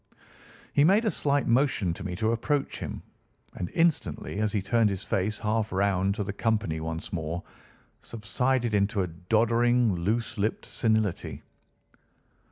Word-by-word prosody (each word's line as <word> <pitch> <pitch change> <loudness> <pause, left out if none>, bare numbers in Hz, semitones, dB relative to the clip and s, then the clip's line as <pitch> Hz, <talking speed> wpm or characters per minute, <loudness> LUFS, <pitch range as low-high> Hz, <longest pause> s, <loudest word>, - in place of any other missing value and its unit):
He 140 - +4
made 200 +8 +4
a 215 - +2
slight 145 -1 +1
motion 115 - +2
to - - -8
me 90 -2 -4
to 110 +5 +1
approach 135 +5 -1
him, - - -6 0.5
and 90 - -4
instantly, 165 -10 0
as 105 -1 +1
he 105 - 0
turned 110 +3 +2
his 100 0 -3
face 105 +3 -1
half 110 0 -1
round 95 0 +1
to 105 - -2
the 100 0 -4
company 105 -7 0
once 80 +1 -5
more, 85 0 -3 0.6
subsided 120 +2 -1
into 100 -1 +2
a - - -2
doddering, 115 +6 +2
loose 110 +6 -1
lipped 105 +3 -1
senility. 110 -5 -1
110 Hz, 150 wpm, -27 LUFS, 95-120 Hz, 0.6 s, He